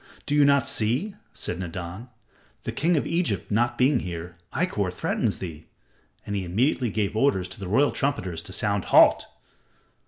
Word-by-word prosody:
"Do - - -2
you 145 -1 +5
not 140 -3 +4
see?" 125 - 0 0.2
said 90 - -4
Nadan. 95 +4 -6 0.6
"The - - -3
king 170 +2 +1
of - - 0
Egypt 110 - -1
not 120 +4 +1
being 130 0 +3
here, 85 -2 -6 0.2
Ikkor 105 - -1
threatens 90 - -1
thee," 80 -4 -8 0.6
and 105 - -3
he 100 - -1
immediately 120 - +1
gave 105 0 -1
orders 110 -7 +2
to - - -11
the 95 - -5
royal 135 +10 +3
trumpeters 95 - -2
to - - -9
sound 100 0 0
"Halt!" - - +5
105 Hz, 165 wpm, -25 LUFS, 90-140 Hz, 0.6 s, you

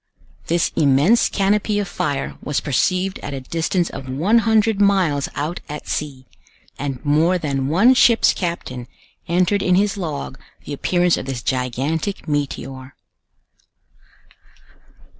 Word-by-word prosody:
This 170 +1 +1
immense 150 - +4
canopy 205 +1 +1
of 205 -1 -1
fire 140 -5 -3
was 150 - -1
perceived 185 +6 0
at 140 - -6
a - - -4
distance 170 +5 -1
of 130 - -8
one 175 - +2
hundred 220 -2 +2
miles 185 -8 +2
out 155 +5 -3
at 150 0 -7
sea, 135 -4 -4 0.5
and 140 0 -5
more 160 +5 +3
than 140 -5 -2
one 195 - +5
ship's 240 -2 +4
captain 130 -9 -4 0.4
entered 185 +4 +2
in 180 - +2
his 200 +2 +1
log 150 -7 -5 0.3
the 145 - -5
appearance 175 +4 +1
of - - -6
this 130 -3 -4
gigantic 135 +9 -2
meteor. 135 -3 -4
160 Hz, 130 wpm, -20 LUFS, 140-195 Hz, 0.5 s, one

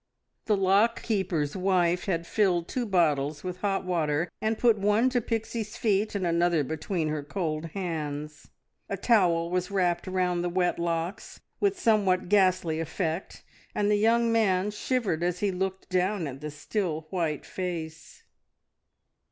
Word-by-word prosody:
The 210 -2 +2
lock 200 +4 +3
keeper's 180 -9 -1
wife 180 -2 +1
had 170 -4 -1
filled 180 -4 +1
two 245 -2 -2
bottles 150 -6 +1
with 180 -1 -4
hot 195 0 -1
water, 165 -2 0
and 220 0 0
put 230 -3 +3
one 210 +6 +3
to 245 -1 +1
Pixie's 225 0 -3
feet, 210 -1 +1
and 195 -2 -1
another 170 -2 +2
between 160 +3 -2
her 150 -1 -2
cold 155 0 -3
hands; 150 -4 -4 0.4
a 200 - -2
towel 175 -6 +3
was 180 0 -1
wrapped 180 -3 0
round 180 -2 0
the 175 - 0
wet 180 0 0
locks 170 +2 -3 0.2
with 395 -2 +1
somewhat 200 - +2
ghastly 185 -5 +3
effect, 165 +2 -3 0.3
and 210 0 +2
the - - +4
young 230 +2 +3
man 205 -3 +2
shivered 210 -6 -1
as 175 0 0
he 200 +1 0
looked 190 +1 -3
down 185 0 +1
at 135 -1 -7
the 150 - -4
still, 160 +1 -3
white 165 -6 -1
face. 165 -3 -6
180 Hz, 150 wpm, -27 LUFS, 165-205 Hz, 0.4 s, the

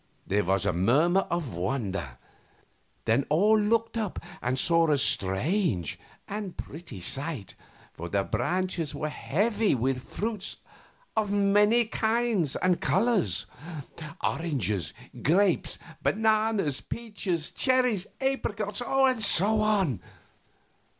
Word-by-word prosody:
There 105 +1 +1
was 95 +1 +1
a 105 - +1
murmur 150 - +3
of 170 - -2
wonder, 95 - -3 0.9
then 115 +5 +2
all 200 +9 +4
looked 225 +2 +1
up 210 -4 -3 0.2
and 130 +2 -1
saw 165 +3 +4
a 150 - +3
strange 100 - +1 0.3
and 205 -3 -5
pretty 155 - -8
sight, 135 - -3 0.4
for 85 +1 -7
the 100 +2 +1
branches 180 - -2
were 150 +2 -3
heavy 205 +6 0
with 130 +1 -1
fruits 210 -2 -3 0.6
of 215 -2 +1
many 205 +3 +4
kinds 220 - 0
and 180 -1 +1
colors 195 - +2 0.8
oranges, 105 - -1 0.3
grapes, 185 +3 +2 0.2
bananas, 215 -8 +1
peaches, 200 -8 -4
cherries, 250 -7 +1
apricots, 215 -6 -1
and 265 -2 +2
so 215 +2 +6
on. 195 - +1
180 Hz, 110 wpm, -27 LUFS, 130-215 Hz, 0.9 s, so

